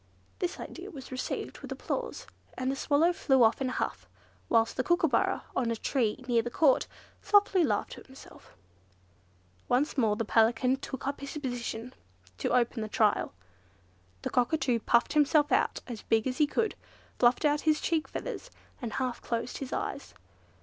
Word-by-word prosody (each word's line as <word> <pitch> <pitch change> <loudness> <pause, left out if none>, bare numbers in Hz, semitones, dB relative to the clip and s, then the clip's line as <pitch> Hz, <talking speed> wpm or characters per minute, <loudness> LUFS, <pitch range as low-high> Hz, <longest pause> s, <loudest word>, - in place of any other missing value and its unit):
This 360 -2 -2
idea 370 +3 -8
was 270 -8 -10
received 255 - -4
with - - -9
applause, 485 -1 -4 0.3
and 255 +1 0
the - - -2
Swallow 310 +5 +2
flew 265 -6 +3
off 225 +4 +3
in 260 - 0
a - - -4
huff; - - -3 0.4
whilst 225 -1 +3
the 255 - 0
Kookooburra, 340 -2 +2
on 245 -3 +1
a 230 - 0
tree 240 0 -1
near 235 -2 +3
the 240 - -4
Court, 275 +1 +3 0.3
softly 405 -3 +4
laughed - - 0
to - - -9
himself. 265 - -15 1.1
Once 275 +3 +1
more 220 -4 +3
the 230 +1 -2
Pelican 235 +4 +3
took 265 -1 -7
up 280 +1 -2
his 280 +2 -6
position 245 -3 -4 0.5
to - - -1
open 240 -1 +2
the 215 - -4
trial. 210 -1 +2 0.9
The - - -3
Cockatoo 250 -1 +1
puffed 235 +2 +2
himself 295 0 +3
out - - +2
as 235 -4 -7
big 225 -1 +1
as 255 +1 -2
he 300 - +5
could, 440 +8 0 0.5
fluffed 245 +5 +4
out 295 0 +3
his 310 -1 +2
cheek 325 -2 0
feathers, - - -6 0.3
and 235 -3 -4
half 255 -2 -2
closed 235 +1 -3
his 270 -1 -6
eyes. - - -4
260 Hz, 170 wpm, -29 LUFS, 235-300 Hz, 1.1 s, he